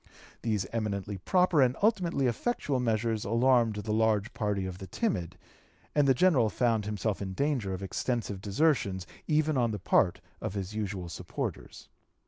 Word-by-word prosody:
These 105 Hz, -4 st, 0 dB
eminently 100 Hz, -3 st, -2 dB
proper 180 Hz, -, +3 dB
and 130 Hz, 0 st, +3 dB
ultimately 180 Hz, -, +2 dB
effectual 135 Hz, -, 0 dB
measures 115 Hz, -2 st, 0 dB
alarmed 115 Hz, 0 st, +3 dB
the 105 Hz, +1 st, -4 dB
large 110 Hz, -1 st, +1 dB
party 105 Hz, -3 st, -1 dB
of 90 Hz, 0 st, -6 dB
the 95 Hz, -, -8 dB
timid; 90 Hz, -, -2 dB, 0.6 s
and 145 Hz, -2 st, +3 dB
the 135 Hz, -, +5 dB
General 130 Hz, -8 st, +4 dB
found 115 Hz, -2 st, +1 dB
himself 105 Hz, -1 st, -2 dB
in 95 Hz, -1 st, -4 dB
danger 130 Hz, -5 st, 0 dB
of 95 Hz, +1 st, -4 dB
extensive 105 Hz, -1 st, -2 dB
desertions 100 Hz, -, +1 dB, 0.2 s
even 155 Hz, -1 st, +2 dB
on 120 Hz, -1 st, +2 dB
the 105 Hz, -, -2 dB
part 90 Hz, -1 st, +2 dB, 0.2 s
of 95 Hz, -, -4 dB
his 100 Hz, 0 st, -4 dB
usual 100 Hz, -4 st, -3 dB
supporters. -, -, -6 dB
110 Hz, 155 wpm, -29 LUFS, 100-130 Hz, 0.6 s, the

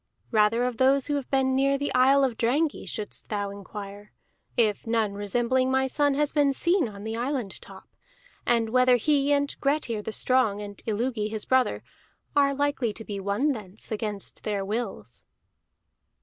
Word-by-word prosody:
Rather 220 Hz, +1 st, +3 dB
of 250 Hz, -2 st, -1 dB
those 265 Hz, +1 st, +3 dB
who 290 Hz, -, -1 dB
have 280 Hz, -3 st, -2 dB
been 265 Hz, -1 st, +2 dB
near 275 Hz, +1 st, +3 dB
the 285 Hz, +1 st, -2 dB
isle 270 Hz, +2 st, +5 dB
of 255 Hz, -4 st, +1 dB
Drangey 285 Hz, +7 st, 0 dB
shouldst 210 Hz, -1 st, -5 dB
thou 205 Hz, -2 st, -2 dB
inquire, 200 Hz, +1 st, -9 dB, 0.5 s
if 220 Hz, -2 st, +1 dB
none 225 Hz, -3 st, +1 dB
resembling 240 Hz, +6 st, 0 dB
my 265 Hz, 0 st, +2 dB
son 285 Hz, +1 st, +1 dB
have 295 Hz, +1 st, 0 dB
been 290 Hz, -2 st, +3 dB
seen 340 Hz, -, +2 dB
on 200 Hz, -1 st, -10 dB
the 220 Hz, +1 st, -4 dB
island 245 Hz, -4 st, -3 dB
top; -, -, -12 dB, 0.6 s
and 230 Hz, -2 st, +2 dB
whether 255 Hz, 0 st, +5 dB
he, 285 Hz, +3 st, +2 dB
and 285 Hz, 0 st, +1 dB
Grettir 275 Hz, -6 st, 0 dB
the 220 Hz, -, -5 dB
Strong, 225 Hz, -3 st, +1 dB
and 205 Hz, -1 st, -8 dB
Illugi 220 Hz, 0 st, -1 dB
his 215 Hz, -1 st, -5 dB
brother, 260 Hz, -1 st, +2 dB, 0.5 s
are 280 Hz, -1 st, +3 dB
likely 285 Hz, -5 st, 0 dB
to 225 Hz, +1 st, -8 dB
be 200 Hz, -1 st, -5 dB
won 200 Hz, +10 st, +1 dB
thence 210 Hz, -4 st, -8 dB
against 210 Hz, -2 st, -4 dB
their 200 Hz, -2 st, -2 dB
wills." 195 Hz, -, -4 dB
240 Hz, 170 wpm, -26 LUFS, 210-275 Hz, 0.6 s, isle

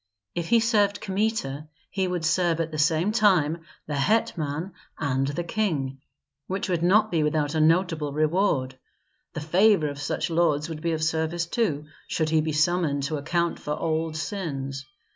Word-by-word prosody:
If 170 Hz, -1 st, -3 dB
he 235 Hz, 0 st, +5 dB
served 210 Hz, -3 st, +2 dB
Kmita 190 Hz, -8 st, -2 dB, 0.2 s
he 190 Hz, 0 st, 0 dB
would 180 Hz, -2 st, -2 dB
serve 170 Hz, 0 st, +2 dB
at 165 Hz, -1 st, -1 dB
the 155 Hz, -, -4 dB
same 160 Hz, +6 st, +2 dB
time 185 Hz, -8 st, +3 dB, 0.3 s
the 150 Hz, -, -5 dB
hetman 170 Hz, -2 st, 0 dB, 0.3 s
and 135 Hz, -2 st, 0 dB
the 145 Hz, +5 st, -2 dB
king, 155 Hz, -9 st, -2 dB, 0.5 s
which 190 Hz, +2 st, -2 dB
would 175 Hz, -3 st, 0 dB
not 210 Hz, +5 st, +4 dB
be 165 Hz, -3 st, +2 dB
without 150 Hz, 0 st, 0 dB
a 160 Hz, -, +1 dB
notable 165 Hz, -2 st, +2 dB
reward. 150 Hz, -4 st, +1 dB, 0.5 s
The 160 Hz, -, -4 dB
favor 175 Hz, +1 st, +3 dB
of 145 Hz, 0 st, -7 dB
such 145 Hz, -, -2 dB
lords 160 Hz, -2 st, +1 dB
would 155 Hz, -2 st, -6 dB
be 170 Hz, 0 st, 0 dB
of 155 Hz, 0 st, -2 dB
service, 160 Hz, +2 st, 0 dB
too, 165 Hz, -7 st, -1 dB, 0.2 s
should 155 Hz, -1 st, -1 dB
he 160 Hz, -1 st, +4 dB
be 155 Hz, 0 st, -2 dB
summoned 155 Hz, -2 st, +1 dB
to 150 Hz, +2 st, -1 dB
account 170 Hz, +4 st, -1 dB
for 150 Hz, 0 st, -3 dB
old 160 Hz, -1 st, -1 dB
sins. 140 Hz, -5 st, -4 dB
160 Hz, 170 wpm, -25 LUFS, 150-185 Hz, 0.5 s, he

